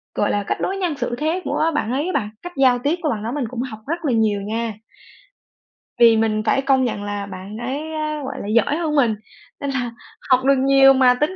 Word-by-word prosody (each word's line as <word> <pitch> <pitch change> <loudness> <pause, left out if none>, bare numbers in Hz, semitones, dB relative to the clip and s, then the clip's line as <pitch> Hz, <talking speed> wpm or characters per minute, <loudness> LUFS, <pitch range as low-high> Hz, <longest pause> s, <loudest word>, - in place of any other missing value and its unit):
gọi - - +1
là, 205 - 0
cách - - -1
đối 390 - -1
nhân 355 -5 -1
xử 245 -2 -2
thế 320 +6 -1
của 325 0 0
bạn 235 - -1
ấy 275 +4 0
á 370 - -2
bạn, 210 - -1
cách 355 0 -8
giao 255 -2 +4
tiếp 285 +6 0
của 315 - 0
bạn 215 -6 -2
đó 225 - -3
mình 275 -1 -2
cũng 240 0 -4
học 240 -4 -6
rất 335 +2 -3
là 280 - +2
nhiều 215 -3 +1
nha. 225 +2 -3 1.3
Vì 230 -1 +7
mình 220 -1 +1
phải 270 - +2
công 270 -1 +3
nhận 210 -4 -3
là 205 -1 -4
bạn 195 +2 -8
ấy 280 +7 -4
á, 305 -1 -3
gọi - - -5
là, - - -6
giỏi 230 +7 +2
hơn 320 -3 -1
mình 240 -7 +3 0.4
nên 280 - -3
là 250 -3 -2 0.4
học 255 -1 +4
được 275 0 +5
nhiều, 270 0 +6
mà 260 -2 +5
tính 310 +5 +1
260 Hz, 245 wpm, -21 LUFS, 225-295 Hz, 1.3 s, Vì